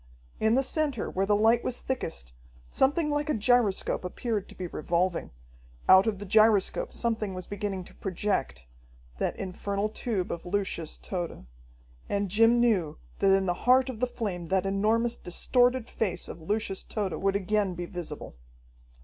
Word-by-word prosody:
In 220 Hz, +1 st, +3 dB
the 270 Hz, -, +3 dB
center 285 Hz, -4 st, -1 dB
where 195 Hz, +1 st, 0 dB
the 205 Hz, -, +4 dB
light 225 Hz, +3 st, +4 dB
was 245 Hz, -, -1 dB
thickest, 160 Hz, -, -4 dB, 0.4 s
something 300 Hz, +3 st, +2 dB
like 290 Hz, +1 st, -1 dB
a -, -, +2 dB
gyroscope 220 Hz, -4 st, +2 dB
appeared 210 Hz, +2 st, -3 dB
to -, -, -13 dB
be 185 Hz, -, -5 dB
revolving. 175 Hz, +2 st, -1 dB, 0.6 s
Out 190 Hz, +3 st, +7 dB
of 215 Hz, -3 st, 0 dB
the 205 Hz, -, -7 dB
gyroscope 215 Hz, 0 st, +3 dB
something 220 Hz, -5 st, -2 dB
was 185 Hz, -1 st, -6 dB
beginning 200 Hz, -2 st, -4 dB
to -, -, -15 dB
project 185 Hz, -, -2 dB, 0.5 s
that -, -, -1 dB
infernal 200 Hz, +2 st, -3 dB
tube 210 Hz, -4 st, -2 dB
of 170 Hz, -, -5 dB
Lucius 180 Hz, -4 st, -2 dB
Tode. 175 Hz, -, -5 dB, 0.6 s
And 200 Hz, -1 st, 0 dB
Jim 225 Hz, +3 st, +5 dB
knew 205 Hz, -10 st, +2 dB, 0.2 s
that 195 Hz, -, +4 dB
in 195 Hz, 0 st, +1 dB
the 175 Hz, -, +1 dB
heart 255 Hz, +7 st, +3 dB
of 225 Hz, -, -10 dB
the 250 Hz, -, +1 dB
flame 190 Hz, -8 st, -4 dB
that 190 Hz, +2 st, +1 dB
enormous, 220 Hz, +4 st, +1 dB
distorted 245 Hz, +6 st, +2 dB
face 205 Hz, -6 st, -2 dB
of 165 Hz, -, -9 dB
Lucius 200 Hz, +2 st, -1 dB
Tode 205 Hz, -4 st, -3 dB
would 195 Hz, 0 st, +1 dB
again 200 Hz, -1 st, 0 dB
be 175 Hz, +1 st, -4 dB
visible. 175 Hz, -5 st, -7 dB
205 Hz, 165 wpm, -28 LUFS, 185-230 Hz, 0.6 s, Out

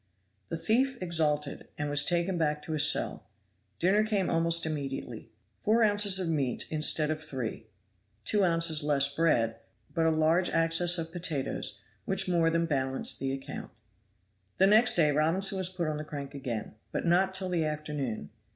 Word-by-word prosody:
The 165 Hz, -, -3 dB
thief 250 Hz, +9 st, +1 dB
exulted, 150 Hz, -5 st, -1 dB
and 145 Hz, -, -3 dB
was 145 Hz, 0 st, +3 dB
taken 175 Hz, +1 st, 0 dB
back 150 Hz, -3 st, -1 dB
to -, -, -7 dB
his 150 Hz, -1 st, +6 dB
cell. -, -, -1 dB, 0.5 s
Dinner 195 Hz, +4 st, +2 dB
came 210 Hz, -4 st, -1 dB
almost 165 Hz, 0 st, +2 dB
immediately. 140 Hz, -4 st, -5 dB, 0.3 s
Four 225 Hz, +2 st, +2 dB
ounces 205 Hz, -2 st, +4 dB
of 185 Hz, -, -2 dB
meat 140 Hz, -6 st, -1 dB
instead 155 Hz, 0 st, +2 dB
of 155 Hz, 0 st, -4 dB
three; 125 Hz, -6 st, -6 dB, 0.6 s
two 205 Hz, -, +2 dB
ounces 165 Hz, -3 st, +2 dB
less 140 Hz, -1 st, +1 dB
bread, 120 Hz, -8 st, +1 dB, 0.4 s
but 165 Hz, -1 st, +1 dB
a -, -, +4 dB
large 160 Hz, +3 st, +2 dB
access 165 Hz, +2 st, +2 dB
of 165 Hz, -1 st, -5 dB
potatoes, 165 Hz, -6 st, -3 dB, 0.3 s
which 195 Hz, 0 st, 0 dB
more 170 Hz, -2 st, +2 dB
than 165 Hz, 0 st, 0 dB
balanced 135 Hz, -4 st, -1 dB
the 135 Hz, 0 st, -2 dB
account. 135 Hz, 0 st, -7 dB, 0.9 s
The 190 Hz, -, +4 dB
next 215 Hz, +4 st, +5 dB
day 155 Hz, -3 st, +4 dB
Robinson 180 Hz, +6 st, +2 dB
was 185 Hz, -1 st, -1 dB
put 180 Hz, -3 st, -4 dB
on 155 Hz, -1 st, -2 dB
the 150 Hz, -, -5 dB
crank 145 Hz, -2 st, -8 dB
again, 125 Hz, -6 st, -5 dB, 0.2 s
but -, -, -3 dB
not 185 Hz, +3 st, +2 dB
till 190 Hz, -1 st, -1 dB
the 170 Hz, -3 st, 0 dB
afternoon. 150 Hz, -6 st, -4 dB
165 Hz, 170 wpm, -29 LUFS, 150-180 Hz, 0.9 s, his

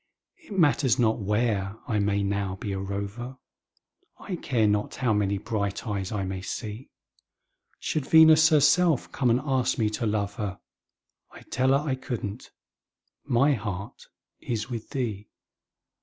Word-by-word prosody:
It 200 Hz, -, -9 dB
matters 145 Hz, -7 st, +3 dB
not 115 Hz, -2 st, +2 dB
where 105 Hz, -1 st, 0 dB
I 110 Hz, -5 st, 0 dB
may 100 Hz, 0 st, +1 dB
now 100 Hz, -1 st, -1 dB
be 100 Hz, +2 st, -5 dB
a 95 Hz, -, -3 dB
rover, 100 Hz, +6 st, -5 dB, 0.8 s
I 185 Hz, -, -5 dB
care 120 Hz, -8 st, +1 dB
not 105 Hz, 0 st, 0 dB
how 120 Hz, -4 st, +1 dB
many 100 Hz, -1 st, +1 dB
bright 100 Hz, -1 st, -3 dB
eyes 100 Hz, -3 st, -3 dB
I 105 Hz, -3 st, -2 dB
may 95 Hz, 0 st, -4 dB
see; 110 Hz, +5 st, -6 dB, 0.9 s
Should 150 Hz, -4 st, -2 dB
Venus 160 Hz, 0 st, +7 dB
herself 155 Hz, 0 st, +3 dB
come 125 Hz, -, +1 dB
and 120 Hz, +2 st, +3 dB
ask 130 Hz, -3 st, +1 dB
me 110 Hz, -2 st, +1 dB
to 110 Hz, +1 st, -2 dB
love 105 Hz, -1 st, -1 dB
her, 100 Hz, -3 st, -4 dB, 0.7 s
I'd -, -, -16 dB
tell 130 Hz, +1 st, +2 dB
her 140 Hz, +3 st, +2 dB
I 135 Hz, -, +1 dB
couldn't 120 Hz, -4 st, -5 dB, 0.8 s
my 135 Hz, +5 st, +3 dB
heart 105 Hz, -4 st, -6 dB, 0.3 s
is 115 Hz, +1 st, -4 dB
with 115 Hz, -2 st, -5 dB
thee. 110 Hz, -7 st, -3 dB
110 Hz, 150 wpm, -26 LUFS, 100-130 Hz, 0.9 s, Venus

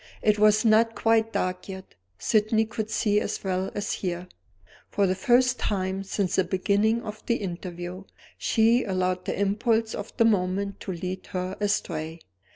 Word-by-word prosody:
It 210 Hz, -1 st, +3 dB
was 215 Hz, +1 st, +5 dB
not 225 Hz, +1 st, +4 dB
quite 225 Hz, 0 st, +2 dB
dark 185 Hz, -1 st, -2 dB
yet. 190 Hz, 0 st, -8 dB, 0.2 s
Sydney 220 Hz, 0 st, +2 dB
could 220 Hz, -1 st, -4 dB
see 210 Hz, -2 st, +2 dB
as -, -, -4 dB
well 190 Hz, 0 st, -1 dB
as 205 Hz, -, -2 dB
hear. 180 Hz, -1 st, -3 dB, 0.6 s
For 200 Hz, -, +1 dB
the 185 Hz, -, +2 dB
first 245 Hz, +5 st, +3 dB
time 190 Hz, -2 st, -1 dB
since 195 Hz, -1 st, -1 dB
the 190 Hz, -, +4 dB
beginning 200 Hz, +5 st, +1 dB
of 215 Hz, 0 st, -7 dB
the 235 Hz, -, +2 dB
interview, 180 Hz, -1 st, -6 dB, 0.3 s
she 230 Hz, +2 st, +3 dB
allowed 185 Hz, -2 st, -1 dB
the -, -, -3 dB
impulse 220 Hz, +3 st, +1 dB
of 205 Hz, -, -6 dB
the 230 Hz, -, +5 dB
moment 200 Hz, -1 st, 0 dB
to 190 Hz, -, -5 dB
lead 180 Hz, +1 st, -5 dB
her 185 Hz, 0 st, -2 dB
astray. 165 Hz, -6 st, -2 dB
200 Hz, 165 wpm, -26 LUFS, 185-220 Hz, 0.6 s, was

